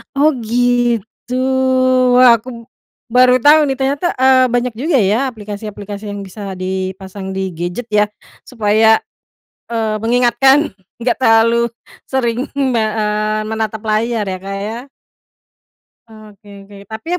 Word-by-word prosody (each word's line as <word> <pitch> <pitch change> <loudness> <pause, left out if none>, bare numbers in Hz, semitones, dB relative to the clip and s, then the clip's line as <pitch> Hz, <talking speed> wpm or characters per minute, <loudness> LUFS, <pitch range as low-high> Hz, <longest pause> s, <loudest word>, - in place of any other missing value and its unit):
Oh 295 +3 +4
gitu, 240 0 -1 0.8
wah 250 -2 +7
aku 235 - -20 0.6
baru 250 +1 +5
tau 300 +2 +7
nih 270 - -1
ternyata, 275 +4 -1
eee, 260 0 +5
banyak 245 0 0
juga 285 +5 0
ya 205 +1 +2
aplikasi-aplikasi 205 -1 -8
yang 205 0 -6
bisa 195 0 -7
dipasang 190 +1 -5
di 190 -1 -3
gadget 175 +8 -5
ya. 210 0 +3 0.4
Supaya, 220 -1 +3 0.7
eee, 225 -2 -1
mengingatkan 245 +5 +3 0.3
nggak 235 +1 0
terlalu 230 0 +3 0.4
sering 250 0 -1
me 260 -5 +1
eee, 215 0 -1
menatap 220 -1 -3
layar 220 +1 0
ya 185 -1 -4
Kak 195 0 -5
ya. 225 +2 -5 1.3
Oke 210 -2 -15
oke 200 0 -15
tapi 220 +5 -9
220 Hz, 120 wpm, -16 LUFS, 205-245 Hz, 1.3 s, wah